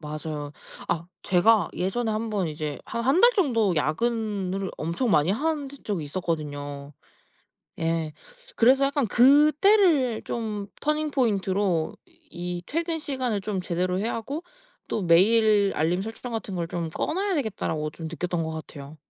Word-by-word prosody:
맞아요. 150 -1 -5 0.4
아 170 0 -1 0.2
제가 195 +1 +4
예전에 220 +6 -1
한번 215 -4 -1
이제 150 -2 -4
한 235 - -4
1 275 +7 +4
달 480 - +8
정도 230 - +2
야근을 195 +2 -1
엄청 170 +10 -1
많이 155 0 +4
한 290 +4 -1
던 280 0 -12
적이 190 -8 -2
있었거든요. 145 -4 -4 0.9
예. 165 -1 -1 0.4
그래서 260 +4 +5
약간 280 -2 +1
그때를 295 - +4
좀 210 -3 -4
터닝 305 +1 0
포인트로 195 - 0 0.3
이 175 0 -5
'퇴근 330 +1 -2
시간을 260 -8 -2
좀 195 -1 -3
제대로 180 +1 -1
해야 220 +4 -1
하고 280 +9 -5 0.4
또 210 - -1
메일 205 +3 +4
알림 170 +4 +1
설정 225 +4 -6
같은 220 -3 -4
걸 170 -2 -2
좀 170 -1 -3
꺼 160 - -2
놔야 390 +3 0
되겠다.'라고 195 - -2
좀 165 +1 -8
느꼈던 170 +1 -2
것 160 - -3
같아요. 150 -1 -9
200 Hz, 285 characters per minute, -26 LUFS, 165-250 Hz, 0.9 s, 달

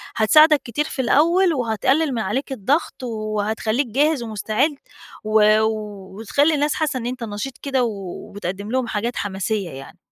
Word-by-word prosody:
هتساعدك 305 +7 +6
كتير 250 +6 -2
في 280 - -3
الأول 335 +8 +3
وهتقلل 265 +4 +1
من 230 - -1
عليك 250 +8 -2
الضغط 265 - -1
وهتخليك 220 +2 -2
جاهز 285 +3 +1
ومستعد 220 +6 -1 0.5
و 215 0 +4 0.6
وتخلي 280 +9 +1
الناس 295 +1 +1
حاسة 305 -4 -1
إن 235 - -6
أنتَ 250 0 -4
نشيط 225 +4 -5
كده 270 -3 -1
وبتقدم 200 -1 -5
لهم 255 -1 0
حاجات 230 +3 -2
حماسية 195 -1 -2
يعني. 135 -2 -10
235 Hz, 140 wpm, -21 LUFS, 215-285 Hz, 0.6 s, هتساعدك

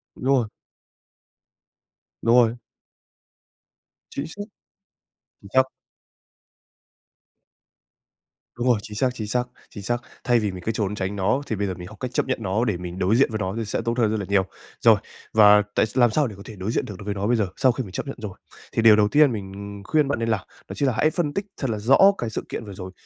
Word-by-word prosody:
Đúng - - -8
rồi. 125 -3 +2 1.8
Đúng 115 +1 +4
rồi. 120 -1 +5 1.6
Chính 140 - -4
xác. 205 +6 -7 1.0
Chính 100 - -13
xác. 130 0 +6 2.9
Đúng 120 +1 -1
rồi, 120 -4 +4
chính 105 - -9
xác, 130 +3 +2
chính 110 -4 -5
xác, 125 +3 +1 0.3
chính 100 - -9
xác. 120 +4 -1 0.2
Thay 120 -1 +3
vì 105 -3 -1
mình 90 -1 -9
cứ 110 - +1
trốn 105 -2 -2
tránh 95 0 -3
nó, 105 +7 +1
thì 110 - -1
bây 100 0 -1
giờ 95 - -2
mình 90 0 -9
học 110 - -12
cách 125 -1 -4
chấp - - +1
nhận 130 - -1
nó 105 +4 0
để 105 -6 0
mình 90 +1 -7
đối 95 +5 +2
diện 135 - +4
với 110 - -1
nó 95 -2 -2
thì 115 - -2
sẽ 105 - -2
tốt 115 +1 -1
hơn 110 -3 +2
rất 110 - -1
là 100 - -4
nhiều. 100 -1 +3 0.4
Rồi, - - +7 0.4
và 105 -1 +7
tại - - +4
làm 120 -3 +4
sao 150 +1 +2
để 105 - -8
có 100 - -12
thể 110 - -9
đối 95 +3 -3
diện - - 0
được 100 - -8
đối 105 - -10
với 105 - -2
nó 100 +1 -2
bây 120 - +3
giờ, 105 -4 +1
sau 130 -2 +4
khi 125 +2 -3
mình 95 - -10
chấp 100 - -4
nhận 135 - -5
rồi? 105 -4 -6 0.4
Thì 115 - +1
điều 110 -1 +8
đầu 105 -1 +4
tiên 145 +3 +5
mình 100 -1 -7
khuyên 150 -2 +2
bạn 140 -3 -1
nên 115 0 -1
làm, 110 -4 +1 0.3
đó - - -5
chính 140 - +1
là 125 - +2
hãy 155 - +4
phân 155 -3 -1
tích 200 - -2
thật 135 - -2
là 110 - -1
rõ 120 +6 +4 0.2
cái 120 - -3
sự 110 - -4
kiện 115 - -5
vừa 100 - -8
rồi 95 0 -8
110 Hz, 235 wpm, -24 LUFS, 100-125 Hz, 2.9 s, điều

